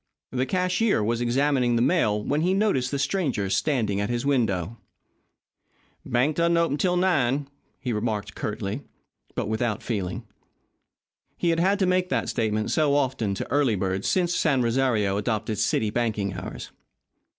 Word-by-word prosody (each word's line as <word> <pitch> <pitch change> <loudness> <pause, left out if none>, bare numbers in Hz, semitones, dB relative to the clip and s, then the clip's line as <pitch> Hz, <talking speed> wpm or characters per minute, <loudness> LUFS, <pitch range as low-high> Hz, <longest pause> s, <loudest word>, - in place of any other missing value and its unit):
The 130 +1 -1
cashier 185 - +1
was 115 +2 0
examining 125 0 +2
the 115 - +2
mail 105 -11 +2
when 145 +6 0
he 185 +3 +2
noticed 195 -12 +1
the 140 - -2
stranger 135 - -1
standing 110 -9 +1
at 100 - -2
his 120 +1 -2
window. 115 - 0 1.2
"Bank 130 +6 +1
doesn't 170 0 +3
open 165 -4 +1
'til 180 -1 +2
nine," 145 -7 +1 0.3
he 125 -4 -2
remarked 105 -2 -2
curtly, 105 +3 -4 0.5
but - - -2
without 110 0 -1
feeling. 105 -1 -3 1.1
He 170 - +1
had 165 - +1
had 195 +4 +3
to 195 - +2
make 185 0 +1
that - - -1
statement 110 -1 -1
so 150 -3 +2
often 130 -8 0
to - - -5
early 140 -5 +3
birds 95 0 -2
since 175 -2 +1
San 135 -7 +2
Rosario 115 -5 +1
adopted 110 -1 -2
city 110 -1 +1
banking 105 -5 -1
hours. 90 0 -7
125 Hz, 155 wpm, -25 LUFS, 105-155 Hz, 1.2 s, doesn't